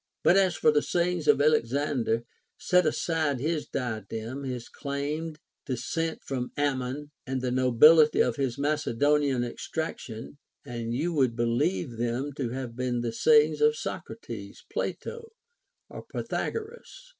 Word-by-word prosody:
But 175 - +6
as 190 -3 +4
for 155 - +4
the 150 0 +3
sayings 175 -2 0
of - - +6
Alexander, 140 -4 +1 0.3
set 180 -2 +3
aside 155 -3 0
his 155 +3 -1
diadem, 120 +2 -4
his 125 -2 -4
claimed 150 +3 -4 0.3
descent 160 +6 -2
from 125 -2 -3
Amnion, 145 0 -1 0.2
and 130 0 -1
the 125 -1 -2
nobility 150 +5 +6
of 120 - +3
his 130 -2 -1
Macedonian 145 -2 +1
extraction, 125 -1 -5 0.3
and 115 -1 -4
you 165 +7 -1
would 130 -6 +2
believe 115 -3 0
them 120 +5 -2
to 130 -3 -3
have 125 -1 -5
been 125 -1 -1
the 115 -1 -2
sayings 450 - +4
of 450 +1 +4
Socrates, - - -7
Plato, 460 -1 -4 0.5
or - - -9
Pythagoras. 465 +2 -5
140 Hz, 135 wpm, -28 LUFS, 120-155 Hz, 0.5 s, But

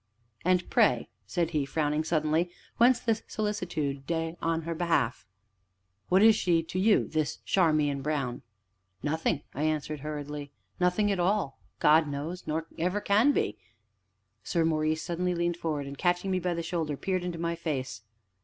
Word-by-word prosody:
"And 180 0 +2
pray," - - +3 0.2
said 170 -2 0
he, 150 -3 +1
frowning 150 +2 0
suddenly, 160 +1 +1 0.3
"whence 240 +1 +5
this 225 -1 0
solicitude 170 -9 -2 0.3
on 165 0 0
her 165 +1 -3
behalf? 155 - 0 0.8
What 190 +3 +5
is 220 -1 +8
she 170 -2 +2
to 175 +3 -4
you 210 +2 +4
this 155 -2 -1
Charmian 155 -6 +2
Brown?" 135 -4 -2 0.6
"Nothing," 155 0 0
I 140 - -4
answered 155 -1 -1
hurriedly, 150 0 -5 0.3
"nothing 180 +4 +2
at 195 - -1
all, 180 -5 0 0.2
God 155 +1 +5
knows 150 +6 -5
nor 160 +1 -1
ever 180 +5 +1
can 210 +7 +4
be - - -1 0.4
" - - -48
Sir 165 -2 +1
Maurice 155 -1 +1
leaned 155 0 0
suddenly 175 0 0
forward, 155 -4 -3
and, 140 0 -8
catching 180 +1 +1
me 185 - +1
by 180 -1 -1
the 170 - -3
shoulder, 160 -4 -2
peered 185 +2 -1
into 175 -1 -3
my 170 0 -1
face. 140 - -3
165 Hz, 160 wpm, -29 LUFS, 150-180 Hz, 0.8 s, is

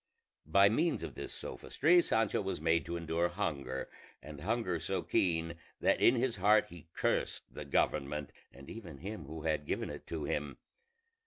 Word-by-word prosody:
By 100 +5 +6
means 155 +11 +1
of - - -5
this - - -6
sophistry 175 +5 +2
Sancho 110 - +1
was 95 -5 -3
made 80 +1 +2
to 85 - -2
endure 85 +1 0
hunger, 80 -8 -3 0.3
and 75 -1 -10
hunger 95 -3 0
so - - -2
keen 85 -2 +1 0.3
that - - +2
in 120 - +6
his 120 -2 0
heart 105 +3 +5
he 85 -2 -12
cursed - - -1
the 75 - -6
government 70 +1 0 0.2
and 70 +1 -13
even 90 -10 -8
him 95 0 -6
who 80 +2 -7
had 75 -2 0
given - - -2
it - - -9
to 80 -2 -4
him. 75 0 -2
85 Hz, 170 wpm, -33 LUFS, 75-105 Hz, 0.3 s, By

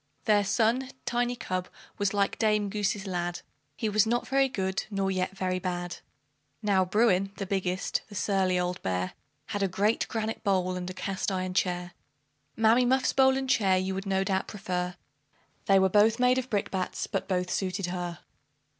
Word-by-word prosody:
Their 210 -1 +4
son, 230 +6 +1 0.2
Tiny 245 0 0
cub, 185 -5 -3 0.3
was 200 -1 +1
like 200 -1 0
Dame 210 -2 +2
Goose's 205 -1 -1
lad; 175 -2 -3 0.4
He 220 - -1
was 215 +1 +3
not 240 +2 0
very 270 0 +3
good, 190 -4 -2
nor 195 -2 0
yet 185 +1 -2
very 185 -1 -1
bad. 175 -1 -3 0.7
Now 195 -3 +3
Bruin, 195 0 +2
the 195 - -3
biggest 185 -1 -1
the 205 - -10
surly 190 -2 +1
old 180 0 -2
bear 90 0 -2 0.4
Had 205 -2 -2
a 195 - +3
great 205 +4 +1
granite 220 -1 -3
bowl, 185 -3 +1
and 180 0 -4
a 185 - -7
cast 195 +1 -2
iron 185 -1 -2
chair. 180 -1 0 0.6
Mammy 225 +2 +4
Muffs 260 +2 +2
bowl 265 -1 +5
and 270 0 -2
chair 195 -7 +3
you 185 +1 -1
would 195 +1 -4
no 190 0 +1
doubt 190 0 -1
prefer 180 -3 -3 0.7
They 195 - +6
were 190 0 +5
both 210 +3 +4
made 250 +1 +4
of 260 0 -6
brick 205 -3 -1
bats, 185 -1 -2
but - - -3
both 180 -1 -1
suited 190 0 -1
her. 175 -1 -4
195 Hz, 180 wpm, -28 LUFS, 185-215 Hz, 0.7 s, They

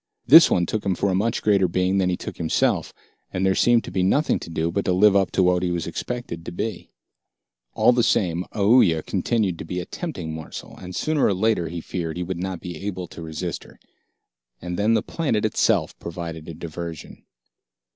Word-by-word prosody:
This 160 +6 +9
one 85 - +2
took 110 +4 -3
him 95 -2 0
for 100 - 0
a - - 0
much 110 +4 0
greater 100 -3 +3
being 95 +2 +1
than 90 -1 +2
he 90 - -1
took - - -7
himself, 80 -2 0 0.4
and 95 +1 -1
there 95 - +3
seemed 120 +3 +3
to - - -8
be 95 - 0
nothing 140 +12 +2
to - - -9
do 80 0 -1
but 100 +3 -1
to 90 - +2
live 100 +2 +5
up 95 -1 +3
to 95 - +3
what 90 0 +3
he 90 - 0
was 85 -2 -2
expected 85 -1 -5
to - - -7
be. 100 +2 -4 0.9
All - - +5
the 120 0 +2
same, 90 -6 +1
Aoooya 100 -6 +4
continued 105 -7 0
to - - -5
be 90 +3 -4
a 90 - -5
tempting 90 - -5
morsel, 80 0 -8
and 90 0 -9
sooner 155 -2 0
or 100 - +2
later, 100 -3 +1
he 85 0 -5
feared, 85 -2 -4
he 90 - -2
would 90 0 -4
not 95 -2 -4
be 90 -3 -7
able 95 -3 -4
to - - -10
resist 80 +2 -5
her. - - -18 0.8
And 90 0 -5
then 105 +4 +2
the - - +1
planet 125 -11 -1
itself 110 - +1
provided 85 -1 -7
a 80 - -7
diversion. 85 -1 -8
90 Hz, 215 wpm, -23 LUFS, 85-105 Hz, 0.9 s, This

